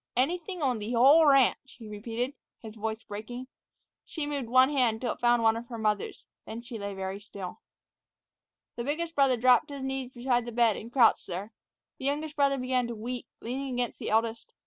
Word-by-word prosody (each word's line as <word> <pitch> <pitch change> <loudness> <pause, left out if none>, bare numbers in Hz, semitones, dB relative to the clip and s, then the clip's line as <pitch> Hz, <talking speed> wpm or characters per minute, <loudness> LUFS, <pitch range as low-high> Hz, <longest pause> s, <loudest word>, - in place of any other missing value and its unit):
"Anything 345 +5 -1
on 250 -4 +1
th' 220 +4 -3
whole 285 +7 +7
ranch," 270 -1 +3
he 225 -3 -10
repeated, 230 +5 -4 0.3
his 220 -1 -10
voice 220 +1 -4
breaking. 225 +5 -7 0.6
She 315 -3 -5
moved 280 -5 -3
one 255 +3 +5
hand 245 -6 +2
till 240 -1 -1
it - - -18
found 240 -1 +3
one 225 0 +4
of 235 +1 -6
her 235 - -6
mother's, 215 -2 -2 0.2
then 230 +2 -7
she 240 -2 -7
lay 200 -1 -5
very 190 +1 -4
still. 200 -3 -8 1.2
The 235 - -2
biggest 325 +5 -2
brother 270 -4 +3
dropped 250 +1 +5
to 285 - -7
his 275 - -6
knees 265 -1 -3
beside 245 -1 0
the - - -4
bed 230 -2 +3
and 230 - -8
crouched 245 -4 +4
there. 195 +4 -5 0.5
The 265 - -6
youngest 295 +2 -2
brother 280 -1 +2
began 255 -1 0
to 235 - -5
weep, 240 +3 -5
leaning 260 +2 -4
against 245 -1 -2
the - - -4
eldest. 225 +1 0
245 Hz, 200 wpm, -29 LUFS, 225-270 Hz, 1.2 s, whole